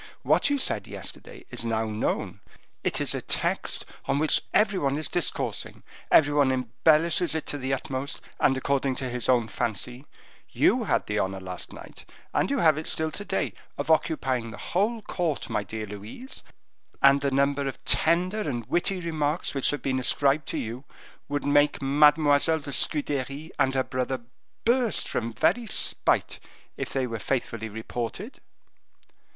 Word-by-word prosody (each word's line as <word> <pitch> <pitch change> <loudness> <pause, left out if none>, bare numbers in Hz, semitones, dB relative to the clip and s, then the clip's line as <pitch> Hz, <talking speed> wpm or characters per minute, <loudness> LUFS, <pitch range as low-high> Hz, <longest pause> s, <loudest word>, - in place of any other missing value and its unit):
What - - +3
you 285 - +2
said 270 - 0
yesterday - - -7
is - - -2
now 115 -1 0
known, 110 0 -2 0.4
it - - +1
is - - +2
a - - -3
text - - 0 0.2
on - - +1
which 155 +1 +4
every 210 -3 +3
one 140 0 0
is 155 - 0
discoursing. 175 - -2 0.3
Every 145 -2 +5
one 140 -2 +4
embellishes 155 +7 +2
it 160 - -2
to 145 - -3
the 130 0 -3
utmost, 135 +1 -3 0.2
and 135 - +3
according 135 0 0
to 130 -1 -3
his 125 0 -2
own 120 -3 +3
fancy; 120 +4 -3 0.4
you - - +2
had - - +1
the - - -1
honor 95 0 -1
last 90 -1 -6
night, - - -11 0.3
and - - +1
you 280 - 0
have 155 - +4
it 160 - -6
still 160 0 +1
to 205 - -5
day, 195 -1 -1 0.2
of - - -1
occupying 135 -7 +1
the 110 - -9 0.2
whole 215 +5 +1
court, 170 -7 -2
my - - 0
dear 110 +2 -5
Louise; 105 - -8 0.6
and 140 0 +6
the 140 - +1
number 140 +1 +1
of 135 - -7
tender 180 +6 +2
and 120 - -3
witty 180 - +1
remarks 155 -1 -1
which 135 -2 +2
have 145 -2 -2
been 130 -1 0
ascribed 140 +3 +2
to - - -3
you, 115 +4 -5 0.5
would 145 0 -2
make 145 +1 +3
Mademoiselle 150 +2 +4
de 140 -1 -7
Scudery 145 +2 0
and 135 0 +2
her 130 - +2
brother 130 0 -2 0.4
burst 240 -1 +2
from 115 -1 -2
very 235 - +1
spite, - - +1 0.4
if - - -5
they 135 -1 0
were 115 -2 -4
faithfully 115 -4 -2
reported." 120 - -5
140 Hz, 170 wpm, -26 LUFS, 125-160 Hz, 0.6 s, and